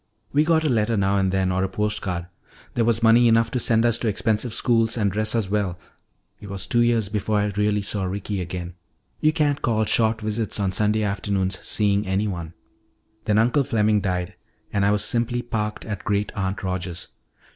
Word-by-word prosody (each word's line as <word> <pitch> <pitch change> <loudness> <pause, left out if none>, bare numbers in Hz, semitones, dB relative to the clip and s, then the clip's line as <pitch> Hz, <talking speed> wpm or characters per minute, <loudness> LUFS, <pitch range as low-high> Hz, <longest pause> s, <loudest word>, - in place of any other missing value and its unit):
We 145 +2 +4
got 160 0 +2
a - - +1
letter 115 -3 +1
now 100 0 +2
and 95 -1 +1
then, 95 -1 +1
or 95 +1 0
a 95 - -1
post 105 +2 -2
card. 90 -2 -3 0.5
There 120 - +1
was 115 0 +1
money 115 +1 +6
enough 115 0 +3
to 125 - -1
send 115 0 +2
us 120 -1 +3
to 115 - -2
expensive 110 +2 0
schools 115 0 +1
and 105 -3 +1
dress 110 +3 -1
us 110 -4 0
well. 100 -3 -1 0.6
It 105 - -10
was 100 -1 -4
two 120 - +1
years 120 -3 +2
before 105 +1 -1
I 105 0 0
really 105 0 +1
saw 100 -1 -1
Ricky 100 +1 -3
again. 90 0 -5 0.5
You 155 - +3
can't 150 -3 0
call 110 -2 +1
short 110 +1 +2
visits 110 0 -2
on 100 -2 0
Sunday 105 +2 +1
afternoons 100 -2 -1
seeing 100 -1 +1
anyone. 95 -4 -2 0.7
"Then 105 -2 +2
Uncle 120 +6 +3
Fleming 105 -3 +2
died 90 -2 -2 0.4
and 100 - +1
I - - +4
was 105 0 +2
simply 120 +1 0
parked 105 -2 -3
at 105 -4 -5
Great 105 0 -1
aunt 95 0 -3
Rogers'. 90 -2 -4
105 Hz, 200 wpm, -23 LUFS, 95-115 Hz, 0.7 s, money